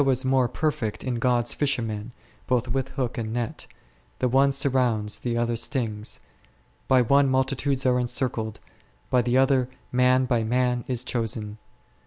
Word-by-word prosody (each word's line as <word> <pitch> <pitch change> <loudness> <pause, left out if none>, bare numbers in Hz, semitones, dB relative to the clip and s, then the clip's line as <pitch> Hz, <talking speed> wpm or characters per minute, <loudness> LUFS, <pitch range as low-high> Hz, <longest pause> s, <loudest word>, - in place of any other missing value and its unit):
57 135 -1 +3
is 130 +1 -2
more 130 -1 +3
perfect 115 -8 -2
is 125 -2 -2
God's 120 -1 +1
fisherman, 120 -6 -1 0.4
both 125 -2 +1
with 135 +2 -2
hook 125 -3 -2
and 110 -1 -3
net; 120 -1 -4 0.5
the 130 - +1
one 135 +3 +4
surrounds, 125 -6 0
the 120 -1 -2
other 120 0 0
stings; 115 -3 -1 0.7
by 130 -1 +5
one 140 +3 +4
multitudes 130 +1 0
are 125 -1 +3
encircled, 120 -3 -2 0.5
by 125 - +4
the 120 +1 +1
other 130 -1 +3 0.2
man 125 +1 +3
by 120 -3 +1
man 125 +1 +1
is 125 -2 -1
chosen. 110 -4 -3
125 Hz, 155 wpm, -25 LUFS, 115-130 Hz, 0.7 s, by